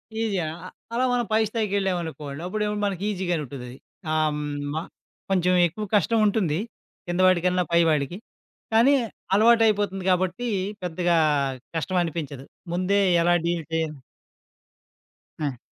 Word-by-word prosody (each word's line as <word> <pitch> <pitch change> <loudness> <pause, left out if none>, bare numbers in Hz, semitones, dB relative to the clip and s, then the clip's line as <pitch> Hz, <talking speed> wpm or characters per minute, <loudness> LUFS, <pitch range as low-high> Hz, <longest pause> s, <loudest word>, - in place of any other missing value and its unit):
ఈజీగా 215 -5 0 0.2
ఆ! - - -6 0.3
అలా 250 +2 +2
మనం 240 -1 +1
పై 215 - +4
స్థాయికెళ్ళామనుకోండి. 185 -9 -2
అప్పుడేమంటే 210 +1 -2
మనకి 195 -2 -2
ఈజీగానూ 180 -5 -1
ఉంటదది. 125 -2 -8 0.3
హ్మ్ 155 -1 +1 0.3
మా 160 - -1 0.5
కొంచెం 185 -1 +2
ఎక్కువ 195 +6 -6
కష్టం 220 +3 +3
ఉంటుంది. 190 -7 +1 0.5
కింద 175 +1 -2
వాడికన్నా, 180 0 +3
పై 170 - +5
వాడికి. 155 +3 0 0.6
కానీ 235 +6 +6 0.4
అలవాటయిపోతుంది 210 -3 +4
గాబట్టి 185 +6 0 0.4
పెద్దగా 175 0 +1 0.6
కష్టం 185 +3 -1
అనిపించదు. 150 -5 -5 0.3
ముందే 185 +3 +1 0.2
ఎలా 175 +1 +3
డీల్ 170 -1 0
చేయ 160 0 +1 1.6
ఆ! 135 -4 -3
180 Hz, 120 wpm, -25 LUFS, 160-205 Hz, 1.6 s, కానీ